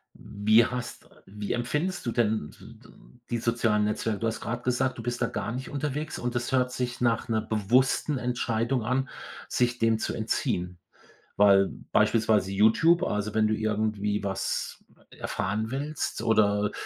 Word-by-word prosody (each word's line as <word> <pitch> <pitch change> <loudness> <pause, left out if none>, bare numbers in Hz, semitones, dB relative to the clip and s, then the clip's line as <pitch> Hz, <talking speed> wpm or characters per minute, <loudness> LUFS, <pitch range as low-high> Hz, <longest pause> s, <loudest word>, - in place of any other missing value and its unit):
Wie 110 +3 +3
hast 125 -1 -6 0.2
wie 105 +1 -5
empfindest 150 +10 -2
du 120 - -1
denn 110 -9 0
d - - -14
d - - -17 0.4
die 120 - 0
sozialen 115 -2 +1
Netzwerke? 105 0 -1
Du 115 - -1
hast 115 - -2
grad 120 +1 -3
gesagt, 125 +1 0
du 115 - -5
bist 120 +1 -3
da - - +3
gar 115 -1 -4
nicht 130 +1 -5
unterwegs 150 +1 -3
und 120 0 -3
es 120 +2 -2
hört 125 -1 +2
sich 125 -1 -3
nach 115 -2 +1
'ner 110 -1 +1
bewussten 125 +6 +1
Entscheidung 120 0 -1
an, 130 +2 0 0.4
sich 125 0 0
dem 115 -1 +2
zu - - -2
entziehen. 90 0 -2 0.6
Weil 100 -1 +6 0.3
beispielsweise 110 -4 +3
YouTube, 110 - +4
also, 105 0 -2
wenn 110 -1 +3
du 110 - +1
irgendwie 105 -1 -1
was 95 -1 -3 0.3
erfahren 110 +4 -3
willst 145 -3 -3
oder 105 -2 +2
115 Hz, 160 wpm, -27 LUFS, 105-125 Hz, 0.6 s, Weil